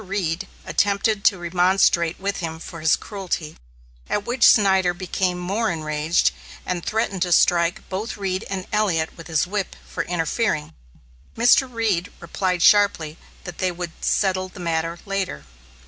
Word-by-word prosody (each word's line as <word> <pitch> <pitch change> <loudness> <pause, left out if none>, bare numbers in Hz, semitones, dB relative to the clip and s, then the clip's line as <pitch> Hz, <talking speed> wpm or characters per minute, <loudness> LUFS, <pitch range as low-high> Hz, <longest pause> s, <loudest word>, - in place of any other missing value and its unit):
Reed 190 -2 -2 0.2
attempted 200 +1 +1
to 200 - +5
remonstrate 175 -1 +2
with 200 +1 -2
him 165 -2 -4
for 165 +1 -9
his 160 - +4
cruelty, 185 -7 -5 0.5
at 205 - -1
which 245 +1 +4
Snyder 190 -4 +4
became 185 0 -1
more 195 +6 -1
enraged, 155 0 +1 0.3
and 175 -2 -3
threatened 215 -4 -1
to 180 -1 0
strike 170 +3 +3
both 205 +5 -4
Reed 190 0 -2
and 190 -1 -4
Elliot 185 -7 +1
with 165 - -11
his 160 -1 +1
whip 195 +1 -3
for - - -3
interfering. 165 - -1 0.6
Mr. 245 +3 +4
Reed 215 -7 -1
replied 180 +1 -1
sharply 195 -7 +4 0.2
that 175 -2 -9
they 185 -1 +1
would 175 -1 -6
settle 185 -2 +1
the 185 - -13
matter 165 -1 -2
later. 195 - -3
185 Hz, 145 wpm, -22 LUFS, 170-200 Hz, 0.6 s, to